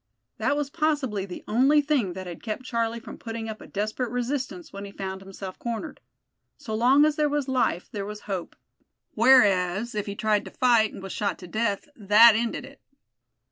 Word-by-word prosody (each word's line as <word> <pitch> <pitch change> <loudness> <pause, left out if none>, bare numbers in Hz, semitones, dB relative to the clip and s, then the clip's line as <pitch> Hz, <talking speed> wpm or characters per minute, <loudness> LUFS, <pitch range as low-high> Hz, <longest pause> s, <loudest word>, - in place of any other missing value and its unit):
That 290 - +1
was 290 -1 -2
possibly 285 - 0
the 180 - -8
only 270 +7 +4
thing 280 - +1
that 185 +1 -7
had 175 -2 -8
kept 225 +3 -4
Charlie 230 -2 -1
from 235 - -11
putting 225 -1 -5
up 220 -1 -7
a - - -11
desperate 215 +4 -2
resistance 245 - -3
when 200 0 -7
he 200 - -8
found 190 -1 -6
himself 195 -1 -9
cornered. 235 +6 -5 0.6
So 245 -7 -7
long 255 +7 +5
as 305 0 +1
there 300 -1 +2
was 290 -2 -1
life 255 -9 0
there 200 -2 -4
was 210 0 -7
hope; 190 -4 -5 0.6
whereas, 210 -3 +4
if 210 -1 -3
he 200 - -4
tried 210 -1 +1
to - - -7
fight, 235 -4 +3
and 190 - -10
was 195 - -6
shot 205 -1 -1
to 180 - -11
death, 215 - -1
that 215 +1 +7
ended 235 +2 -2
it. 275 0 -15
225 Hz, 195 wpm, -26 LUFS, 200-260 Hz, 0.6 s, that